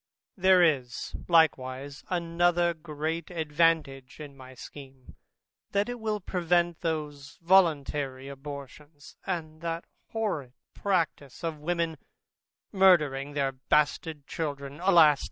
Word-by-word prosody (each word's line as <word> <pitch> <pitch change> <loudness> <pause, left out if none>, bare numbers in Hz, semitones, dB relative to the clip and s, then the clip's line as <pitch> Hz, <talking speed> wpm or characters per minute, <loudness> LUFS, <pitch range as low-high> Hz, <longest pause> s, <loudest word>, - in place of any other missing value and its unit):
There 185 -1 +5
is 130 -7 0
likewise 140 -4 +1
another 175 0 +1
great 160 0 -4
advantage 155 -5 0
in 145 -2 -9
my 130 -1 -13
scheme, 135 -1 -12 0.6
that 200 +3 +1
it 245 0 -5
will 215 -1 -2
prevent 175 -2 0
those 150 -4 -4
voluntary 145 -7 +2
abortions, 145 +1 -10
and 160 -4 -4
that 165 0 -3 0.2
horrid 195 - -3 0.2
practice 170 -7 -2
of 165 -2 -3
women 165 -1 -2 0.7
murdering 150 -8 +3
their 140 -2 0
bastard 145 +2 0
children, 140 -2 -5
alas! 170 -6 +6
155 Hz, 105 wpm, -28 LUFS, 140-175 Hz, 0.7 s, alas